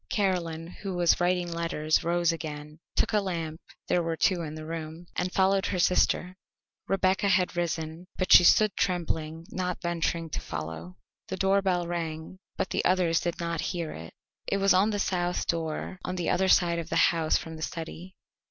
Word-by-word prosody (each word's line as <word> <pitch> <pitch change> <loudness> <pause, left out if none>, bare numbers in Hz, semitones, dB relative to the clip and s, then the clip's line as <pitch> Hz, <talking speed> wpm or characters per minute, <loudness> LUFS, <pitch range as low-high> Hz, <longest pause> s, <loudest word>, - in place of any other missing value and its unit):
Caroline, 175 -5 -1 0.2
who 195 -3 -4
was 175 0 +3
writing 175 -1 +1
letters, 165 -2 0
rose 170 0 +2
again, 150 -2 -7 0.2
took - - +1
a 210 - +3
lamp 165 -4 -4 0.3
(there 180 - +2
were 165 -1 -2
two 180 0 +2
in 155 -2 -5
the 155 0 -7
room) 160 +1 -6
and 180 0 -1
followed 190 +1 +2
her 190 - -2
sister. 180 0 +2 0.5
Rebecca 195 +1 +2
had 185 -2 +2
risen, 165 0 -3
but 185 - +3
she - - +10
stood 215 +4 +5
trembling, 165 -3 -2
not 180 -1 -2
venturing 170 -1 -2
to - - -3
follow. 80 +3 -6 0.3
The 190 - -4
doorbell 195 -2 +2
rang, 165 0 -5 0.2
but 190 - -2
the - - 0
others 180 -2 +3
did 175 -1 -3
not 170 -1 -2
hear 170 -4 -3
it; 80 +1 -10 0.3
it 200 - +1
was 195 0 +4
on 190 +4 +4
the 210 - -1
south 180 -3 -1
door 165 +2 -3
on 180 - -3
the 175 -2 -1
other 190 +1 +2
side 170 -2 +4
of 165 0 -6
the - - -2 0.2
house 160 -2 +2
from 160 0 -7
the 160 - -10
study. 170 +3 -6
175 Hz, 185 wpm, -28 LUFS, 160-185 Hz, 0.5 s, she